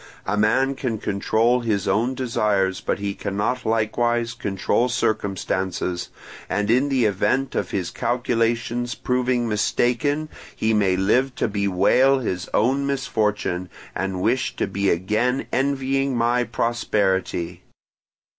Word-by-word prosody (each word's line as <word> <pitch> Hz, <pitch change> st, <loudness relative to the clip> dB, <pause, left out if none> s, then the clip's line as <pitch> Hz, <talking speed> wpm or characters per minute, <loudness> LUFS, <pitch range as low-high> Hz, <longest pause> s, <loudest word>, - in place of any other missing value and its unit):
A 100 Hz, -, 0 dB
man 115 Hz, +6 st, +2 dB
can 125 Hz, -4 st, -3 dB
control 110 Hz, +4 st, +1 dB
his 110 Hz, -5 st, -1 dB
own 115 Hz, +7 st, +1 dB
desires, 105 Hz, -6 st, 0 dB
but -, -, -1 dB
he 100 Hz, 0 st, -3 dB
cannot 105 Hz, +7 st, -2 dB
likewise 115 Hz, +2 st, +1 dB
control 110 Hz, +3 st, 0 dB
circumstances; 95 Hz, -5 st, -1 dB, 0.4 s
and 105 Hz, +3 st, 0 dB
in 130 Hz, +4 st, +3 dB
the 130 Hz, -4 st, +2 dB
event 120 Hz, +7 st, +1 dB
of -, -, -1 dB
his 95 Hz, -4 st, -2 dB
calculations 120 Hz, 0 st, -1 dB
proving 125 Hz, -1 st, 0 dB
mistaken, 125 Hz, +7 st, +1 dB, 0.3 s
he 110 Hz, 0 st, +1 dB
may 100 Hz, -3 st, +3 dB
live 125 Hz, +7 st, +2 dB
to -, -, 0 dB
bewail 100 Hz, +6 st, +3 dB
his 95 Hz, -8 st, -3 dB
own 135 Hz, +5 st, +2 dB
misfortune, 105 Hz, -9 st, -1 dB, 0.2 s
and 95 Hz, 0 st, -2 dB
wish 125 Hz, +4 st, +1 dB
to -, -, 0 dB
be 100 Hz, 0 st, -1 dB
again 110 Hz, +9 st, 0 dB
envying 135 Hz, -1 st, 0 dB
my 120 Hz, +1 st, +2 dB
prosperity. 95 Hz, -7 st, -1 dB
115 Hz, 125 wpm, -23 LUFS, 100-125 Hz, 0.4 s, in